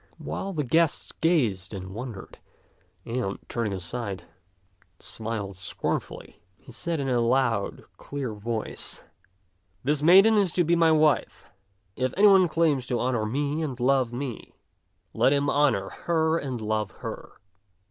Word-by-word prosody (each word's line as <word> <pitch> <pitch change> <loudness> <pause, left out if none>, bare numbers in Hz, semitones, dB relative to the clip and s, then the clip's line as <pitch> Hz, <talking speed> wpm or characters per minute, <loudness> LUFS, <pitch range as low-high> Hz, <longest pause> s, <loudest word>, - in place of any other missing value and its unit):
While 195 - -5
the 155 -5 -2
guests 160 +4 +1
gazed 115 - +1
and 95 0 -7
wondered, 115 -3 -8 0.7
and, 115 -4 -2
turning 115 -3 -2
aside, 95 +2 -4 0.8
smiled 105 -4 -5
scornfully, 95 - -4 0.2
he 130 - -15
said 165 +6 -3
in 135 - -2
a 125 -2 +2
loud, 120 -3 +1
clear 135 -5 -5
voice, 110 +1 -5 0.4
" 90 0 -43
This 145 +2 +1
maiden 195 +7 +7
is 195 -5 +2
to 175 - +3
be 170 +1 +2
my 165 -1 +4
wife. 155 -2 +2 0.5
If 130 0 -2
any 205 - +5
one 190 -3 +7
claims 155 -6 +1
to 125 -3 -1
honor 120 -3 0
me 145 +6 -1
and 135 -5 -4
love 130 -1 +2
me, 125 -1 -6 0.6
let 135 - +3
him 140 0 +1
honor 125 -10 +2
her 160 -1 0
and 130 -4 -4
love 110 -1 -1 0.2
her. - - -7
130 Hz, 145 wpm, -26 LUFS, 110-155 Hz, 0.8 s, maiden